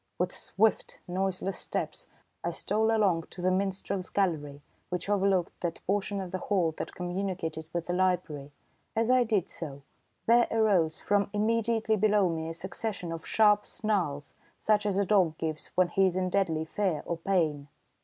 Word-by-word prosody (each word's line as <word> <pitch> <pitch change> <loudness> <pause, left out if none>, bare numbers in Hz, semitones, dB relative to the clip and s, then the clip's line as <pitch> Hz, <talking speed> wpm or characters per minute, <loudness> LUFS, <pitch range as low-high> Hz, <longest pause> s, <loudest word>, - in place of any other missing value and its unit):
With - - -1
swift, 220 +2 0
noiseless 190 +1 -2
steps, - - -4 0.4
I - - 0
stole 220 +1 0
along 200 -7 +2
to - - -12
the 185 +1 +2
minstrel's 190 0 -1
gallery 150 -7 -1 0.3
which 180 0 -3
overlooked 195 -3 +1
that 170 -2 -4
portion 200 +1 0
of 185 -2 -5
the 185 - -2
hall 180 -5 +1
that - - -5
communicated 175 -3 -3
with 170 0 -2
the 175 - -2
library. 180 -6 0 0.4
As 225 +2 +2
I 255 -1 +5
did 215 -6 +1
so, 140 -4 -7 0.4
there 235 +1 +5
arose 195 -8 +2
from 200 -1 +1
immediately 220 +1 +1
below 205 -2 +3
me 160 -1 -3
a - - -4
succession 190 0 -4
of 165 -1 -6
sharp 210 -1 +4
snarls, 175 -10 -1 0.2
such 210 -1 +2
as 195 -2 0
a 200 - +2
dog 180 -6 +3
gives 160 -1 -3
when 185 -1 +4
he 195 +2 +3
is 180 - -1
in 185 -1 0
deadly 165 -5 +1
fear 185 -2 -1
or 170 - -2
pain. 165 -5 0
185 Hz, 170 wpm, -29 LUFS, 165-205 Hz, 0.4 s, I